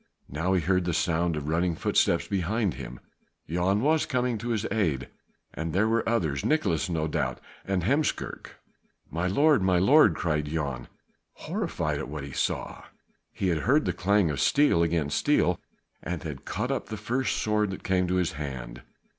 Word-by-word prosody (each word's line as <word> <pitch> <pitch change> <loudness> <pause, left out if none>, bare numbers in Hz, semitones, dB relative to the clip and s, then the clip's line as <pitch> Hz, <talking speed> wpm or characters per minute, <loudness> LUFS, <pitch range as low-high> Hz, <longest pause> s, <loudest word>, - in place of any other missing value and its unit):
Now 80 +7 -1
he 90 - +2
heard 90 +2 +1
the 85 -2 0
sound 85 -1 +1
of 75 -1 -5
running 85 +2 +1
footsteps - - +1
behind 100 +1 0
him; 60 -1 -8 0.5
Jan 90 +5 +1
was 155 +4 +2
coming 125 -3 0
to 120 +2 -4
his 110 -3 -1
aid 80 - 0 0.4
and 80 0 -4
there 100 +4 +3
were 115 0 +1
others; 80 -13 0
Nicolaes 100 - +1
no 80 -2 -1
doubt 75 - -2 0.3
and 95 -3 -1
Heemskerk. 140 - -1 0.6
"My 85 +4 -1
lord! 145 +6 +4
my 95 -1 +3
lord!" 105 - +5
cried 75 -3 -1
Jan, 70 -5 -3 0.5
horrified 150 - -3
at 80 - -5
what 75 -1 -5
he 70 - -7
saw. - - -3 0.5
He 95 - -1
had 85 -3 +1
heard 140 - +2
the - - 0
clang 100 -2 +2
of 70 - -4
steel 145 - +4
against 80 -3 +1
steel - - +2 0.4
and 90 -1 -4
had 75 -4 -7
caught - - -2
up - - -2
the 110 - -4
first 125 +5 -1
sword 105 -1 +1
that 95 - -7
came 90 -1 +1
to 90 - 0
his 90 -2 +1
hand. 65 -4 -6
90 Hz, 180 wpm, -27 LUFS, 80-110 Hz, 0.6 s, lord